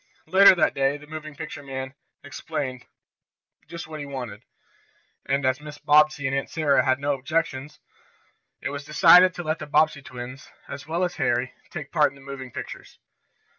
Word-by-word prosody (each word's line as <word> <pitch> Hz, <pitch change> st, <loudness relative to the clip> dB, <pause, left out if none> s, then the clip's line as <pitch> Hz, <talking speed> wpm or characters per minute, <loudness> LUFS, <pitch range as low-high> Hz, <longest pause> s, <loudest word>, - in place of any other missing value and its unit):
Later 190 Hz, 0 st, +7 dB
that 170 Hz, -, +2 dB
day 140 Hz, +1 st, +1 dB
the 150 Hz, -, -14 dB
moving 155 Hz, -1 st, -8 dB
picture 145 Hz, -, -7 dB
man 130 Hz, -1 st, -6 dB, 0.3 s
explained 140 Hz, -3 st, -5 dB, 0.8 s
just 170 Hz, 0 st, -7 dB
what 155 Hz, -1 st, -8 dB
was 145 Hz, -, -6 dB
wanted, 125 Hz, -7 st, -6 dB, 0.9 s
and 140 Hz, 0 st, 0 dB
as 130 Hz, 0 st, +1 dB
Mrs. 150 Hz, -1 st, -11 dB
Bobbsey 150 Hz, -1 st, +4 dB
and 135 Hz, +1 st, 0 dB
Aunt 140 Hz, -, -2 dB
Sarah 150 Hz, -3 st, +2 dB
had 130 Hz, -2 st, +2 dB
no 145 Hz, +1 st, 0 dB
objections, 145 Hz, 0 st, -2 dB, 0.8 s
it -, -, -3 dB
was 145 Hz, 0 st, -5 dB
decided 175 Hz, +4 st, +6 dB
to 175 Hz, -, -5 dB
let 155 Hz, 0 st, -2 dB
the -, -, -7 dB
Bobbsey 150 Hz, -1 st, +2 dB
twins, 125 Hz, +1 st, -9 dB, 0.2 s
as 140 Hz, +1 st, -8 dB
well 170 Hz, +3 st, -1 dB
as 180 Hz, -1 st, -2 dB
Harry, 120 Hz, +1 st, 0 dB, 0.2 s
take 150 Hz, -5 st, -7 dB
part 150 Hz, -1 st, +4 dB
in -, -, -18 dB
the 140 Hz, -, -16 dB
moving 135 Hz, -2 st, -8 dB
pictures. -, -, -9 dB
145 Hz, 175 wpm, -25 LUFS, 135-155 Hz, 0.9 s, Later